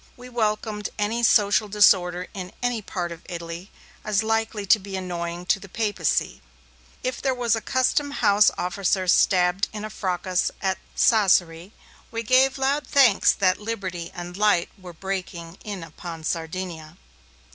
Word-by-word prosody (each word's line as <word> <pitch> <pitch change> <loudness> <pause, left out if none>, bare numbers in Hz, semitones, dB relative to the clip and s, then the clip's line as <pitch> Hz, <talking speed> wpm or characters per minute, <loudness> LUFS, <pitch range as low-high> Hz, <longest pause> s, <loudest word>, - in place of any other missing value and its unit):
We 250 0 -11
welcomed 215 -3 -2
any 215 +3 -1
social 210 -2 +4
disorder 180 -3 +3
in 185 -2 -7
any 245 -2 0
part 175 -3 -4
of 170 - -9
Italy, 170 +2 -7 0.3
as 210 0 +1
likely 225 -1 -1
to 215 +3 +5
be 195 0 -7
annoying 175 -1 -5
to 195 - +2
the 195 - -12
Papacy. 205 -6 -1 0.6
If 255 -1 -3
there 265 -2 0
was 240 -3 +1
a 225 - -4
custom 260 +5 +1
house 210 -7 +4
officer 185 +1 -1
stabbed 180 +1 +3
in 215 0 -6
a 215 - -7
fracas 185 -2 -1
at 190 -1 -1 0.2
Sassari, 185 -5 +3 0.4
we 230 0 -4
gave 260 +3 +4
loud 275 +2 0
thanks 255 -8 +5
that 185 0 +1
liberty 190 -6 -5
and 175 0 -7
light 205 -4 +2
were 185 -2 -11
breaking 180 -1 -6
in 200 -4 -6
upon 165 0 -9
Sardinia. 165 0 -5
195 Hz, 150 wpm, -24 LUFS, 180-220 Hz, 0.6 s, to